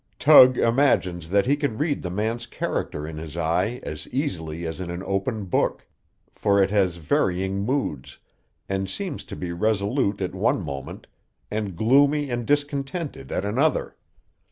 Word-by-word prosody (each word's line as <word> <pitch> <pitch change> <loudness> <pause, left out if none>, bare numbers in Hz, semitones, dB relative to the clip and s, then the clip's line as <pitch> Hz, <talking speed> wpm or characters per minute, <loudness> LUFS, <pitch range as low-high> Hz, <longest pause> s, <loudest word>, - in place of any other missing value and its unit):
Tug 130 -4 +8
imagines 95 - +2
that 100 +1 +3
he 140 +3 +3
can 145 -7 -2
read 150 -1 0
the 90 - -4
man's 110 +5 -2
character 75 +1 -3
in 80 -1 -6
his 80 0 -8
eye 85 +9 0
as - - -6
easily 85 - -3
as 80 +2 -5
in 90 - -5
an 85 +2 -5
open 100 +2 -2
book, 90 - 0 0.5
for 100 0 +2
it 95 0 +3
has 95 -4 +2
varying 95 +4 0
moods, 105 - -2 0.5
and 95 -1 -2
seems 190 - -4
to - - -8
be 90 -1 -5
resolute 100 +1 0
at 95 -2 -3
one - - +1
moment, 70 -1 -7 0.5
and 105 -3 -3
gloomy 140 - +3
and 120 -1 -3
discontented 145 +1 -2
at 95 - -1
another. 130 +9 0
100 Hz, 155 wpm, -24 LUFS, 90-135 Hz, 0.5 s, Tug